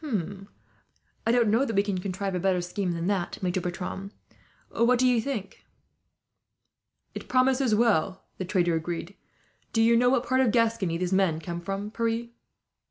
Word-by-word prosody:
"I - - +4
don't 235 -3 +3
know 230 +5 +3
that 225 -6 -2
we 200 - +4
can 200 -3 -2
contrive 195 +1 -3
a 180 - -1
better 185 0 +1
scheme 180 +1 -2
than 170 0 -3
that, 190 -2 -1
Maitre 180 0 0
Bertram. 180 +3 -5 0.6
What 235 +2 +3
do 255 - +2
you 245 -2 +3
think?" 225 -6 -5 1.5
"It - - -8
promises 255 -2 +3
well," 205 -5 +1 0.2
the 185 - -2
trader 175 -2 +1
agreed. 170 +3 -4 0.6
"Do 225 - +3
you 230 +1 +5
know 245 +1 +4
what 255 -1 +1
part 260 +1 +2
of 255 - +3
Gascony 225 -7 +1
these 180 +1 -2
men 190 -5 +2
come 170 +1 -5
from, 195 +3 -4
Pierre?" 230 +1 -1
200 Hz, 165 wpm, -27 LUFS, 180-235 Hz, 1.5 s, you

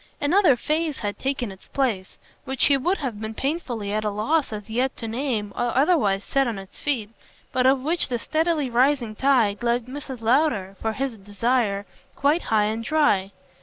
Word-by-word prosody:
Another 340 0 +4
phase 305 +3 -1
had 205 -2 -4
taken 265 -5 -2
its 190 - -13
place, 225 -9 -2 0.3
which 265 -1 +1
he 285 - +5
would 350 +9 +1
have 245 -8 -4
been 220 0 -5
painfully 250 -9 -3
at 215 0 0
a 210 - 0
loss 265 +9 0
as 210 -1 -6
yet 250 +4 -1
to 230 - -5
name 225 -4 -2
or 240 0 -1
otherwise 265 - +3
set 270 +4 +1
on 230 -4 -2
its 195 0 -10
feet, 235 -8 -1 0.4
but 255 0 +2
of 265 -1 +3
which 330 +2 0
the 245 - 0
steadily 315 +2 0
rising 245 -2 +2
tide 240 -6 +2
left 240 0 +1
Mrs. 265 -1 -7
Lowder, 230 -6 +2
for 220 0 -1
his 260 -3 -3
desire, 205 0 0 0.3
quite 295 +5 +2
high 215 -2 +3
and 220 +2 -2
dry. 225 -9 +2
245 Hz, 185 wpm, -24 LUFS, 215-280 Hz, 0.4 s, he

